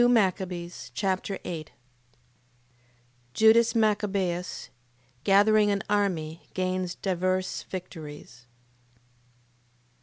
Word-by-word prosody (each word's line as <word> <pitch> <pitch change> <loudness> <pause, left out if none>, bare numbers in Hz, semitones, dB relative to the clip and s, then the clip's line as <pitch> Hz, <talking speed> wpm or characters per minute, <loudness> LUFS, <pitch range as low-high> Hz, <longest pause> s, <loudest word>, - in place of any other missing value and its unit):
2 240 - +6
Machabees 185 -6 0
Chapter 195 0 -1
8 160 -3 -5 1.7
Judas 225 +1 +6
Machabeus 200 -5 0 0.5
gathering 205 +2 +5
an 200 -1 0
army 175 -6 0
gains 185 -1 -1
divers 185 0 -1
victories. 150 -9 -8
185 Hz, 70 wpm, -27 LUFS, 175-205 Hz, 1.7 s, 2